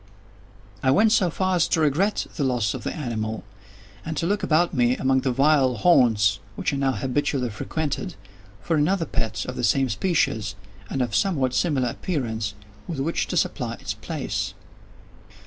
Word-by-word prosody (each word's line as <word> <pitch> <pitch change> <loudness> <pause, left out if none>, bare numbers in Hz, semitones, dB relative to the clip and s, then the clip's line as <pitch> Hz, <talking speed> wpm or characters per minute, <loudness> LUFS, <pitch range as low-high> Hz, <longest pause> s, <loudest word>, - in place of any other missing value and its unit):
I 130 - +2
went 215 +11 +5
so 190 -5 +3
far 185 +2 0
as 170 - +3
to 165 - +1
regret 160 +8 +1
the 145 - -1
loss 120 -6 +1
of - - -6
the - - -2
animal, 110 -7 -3 0.6
and 160 -1 -5
to - - 0
look 205 +4 0
about 170 +3 +2
me, 125 -2 +2
among 130 0 +2
the 130 - 0
vile 135 -1 +3
haunts 110 - +4 0.2
which - - -1
I - - -1
now 135 -1 +1
habitually 135 -2 -1
frequented, 160 - -3 0.5
for 165 - 0
another 165 +4 +2
pet 115 - -2
of 125 - -5
the - - -4
same 130 +4 +3
species, 110 - 0 0.3
and 135 - 0
of 120 - -3
somewhat 140 -10 +1
similar 135 -7 +1
appearance, 115 - -3 0.3
with 165 -5 -4
which 160 +5 -1
to - - -2
supply - - -1
its - - -5
place. - - -4
135 Hz, 170 wpm, -24 LUFS, 125-165 Hz, 0.6 s, went